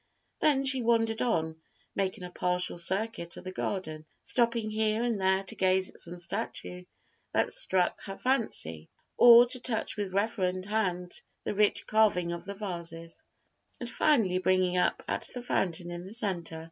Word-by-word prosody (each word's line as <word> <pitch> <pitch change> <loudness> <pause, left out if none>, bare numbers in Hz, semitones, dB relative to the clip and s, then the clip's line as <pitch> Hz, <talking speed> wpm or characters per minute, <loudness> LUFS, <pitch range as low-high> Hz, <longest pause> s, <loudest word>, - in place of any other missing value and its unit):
Then 275 -3 +3
she 265 -1 +3
wandered 225 -1 +1
on, 160 -9 0 0.4
making 190 -2 -2
a 180 - -7
partial 180 0 -1
circuit 190 -1 0
of - - -9
the 185 - -6
garden, 155 -5 -4 0.2
stopping 235 -3 +1
here 215 +1 0
and 230 -5 -1
there 190 +1 +2
to 190 - -5
gaze 185 0 +2
at - - -14
some 175 +1 -6
statue 180 -1 -4 0.5
that - - +1
struck 190 - +1
her 195 -1 -6
fancy 80 - -1 0.3
or 240 0 +9
to 250 +1 +1
touch 235 -3 -2
with 195 -2 -3
reverend 190 -3 0
hand 185 -4 -2 0.2
the - - -2
rich 210 0 +2
carving 205 -6 +2
of 170 0 -6
the 200 +1 -6
vases, 170 -4 -6 0.6
and 245 - -5
finally 220 -14 +2
bringing 185 -1 +2
up 180 - +1
at - - -2
the 245 - -4
fountain 175 -6 -1
in 175 0 -6
the 190 +3 -8
centre. 180 -8 0
190 Hz, 165 wpm, -29 LUFS, 180-225 Hz, 0.6 s, or